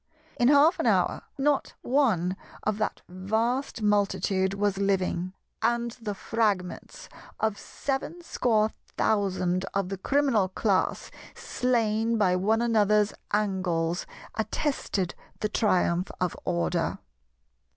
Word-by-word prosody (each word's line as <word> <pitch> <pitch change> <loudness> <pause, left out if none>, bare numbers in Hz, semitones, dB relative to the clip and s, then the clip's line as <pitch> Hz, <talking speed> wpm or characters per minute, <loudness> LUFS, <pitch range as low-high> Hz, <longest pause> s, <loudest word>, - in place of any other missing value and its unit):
In 240 - +4
half 290 +5 +5
an - - +1
hour - - +2 0.2
not 280 0 +1
one 215 - +2 0.3
of 215 0 -1
that 215 - -2
vast 220 +7 -1
multitude 200 -2 +1
was 200 -1 0
living; 185 -2 0 0.3
and 235 0 +1
the 210 -3 -3
fragments 200 -4 -2 0.3
of 220 -2 0
seven 285 +5 -4
score 220 -8 +1 0.3
thousand 185 -3 +1
of 195 -2 0
the 195 -1 -4
Criminal 265 -6 +2
Class 195 0 0 0.2
slain 230 -2 0
by 185 -4 +3
one 220 +5 +2
another's 210 -2 +3 0.2
angles 185 -5 0 0.3
attested 220 - -1 0.3
the 210 - 0
triumph 180 -5 +1
of 180 -2 -1
Order. 85 -2 0
210 Hz, 110 wpm, -27 LUFS, 185-230 Hz, 0.3 s, half